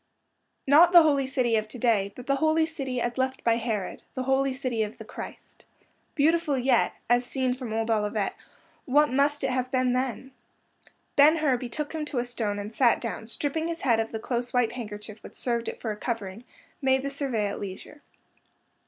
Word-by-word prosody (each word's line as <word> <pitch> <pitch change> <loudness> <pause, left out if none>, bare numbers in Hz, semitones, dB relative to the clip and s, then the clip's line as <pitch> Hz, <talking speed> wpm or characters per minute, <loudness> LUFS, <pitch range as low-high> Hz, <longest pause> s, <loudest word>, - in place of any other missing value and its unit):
Not 325 +6 +6
the 345 -2 +10
Holy 280 -4 +2
City 255 -4 +1
of 215 0 -2
to 235 - -9
day, 215 -5 +2
but 250 - -9
the 275 0 +1
Holy 315 +2 +3
City 275 -6 -4
as 240 +1 -2
left 260 0 -1
by 230 0 +3
Herod—the 225 +2 -4
Holy 270 +1 +2
City 255 -4 -2
of 215 0 -3
the - - -10
Christ. - - -10 0.5
Beautiful 310 -1 +2
yet, 250 -2 +2
as 245 +1 +3
seen 255 0 -1
from 250 -3 -6
old 225 +1 -1
Olivet, 210 -1 0 0.5
what 290 +2 +3
must 285 +2 +2
it 270 - +1
have 255 0 -1
been 255 -1 +1
then? 260 +1 -2 0.8
Ben 295 +3 +7
Hur 300 -5 +2
betook 260 +6 -5
him 315 -1 -2
to 295 - -5
a 240 - +1
stone 225 -4 -2
and 205 +2 -6
sat 240 -1 +4
down, 230 - -4
and, 220 - -13
stripping 295 +7 -2
his 335 0 -4
head 235 -4 +3
of 225 0 -2
the 225 - -3
close 240 +2 -3
white 245 -2 +2
handkerchief 210 -3 -8
which - - -12
served 235 -2 -2
it - - -5
for 220 -3 -3
covering, 210 0 -5 0.4
made 265 -1 +2
the 280 - -3
survey 270 -7 -1
at 200 - -3
leisure. 200 +9 -8
250 Hz, 195 wpm, -27 LUFS, 225-275 Hz, 0.8 s, the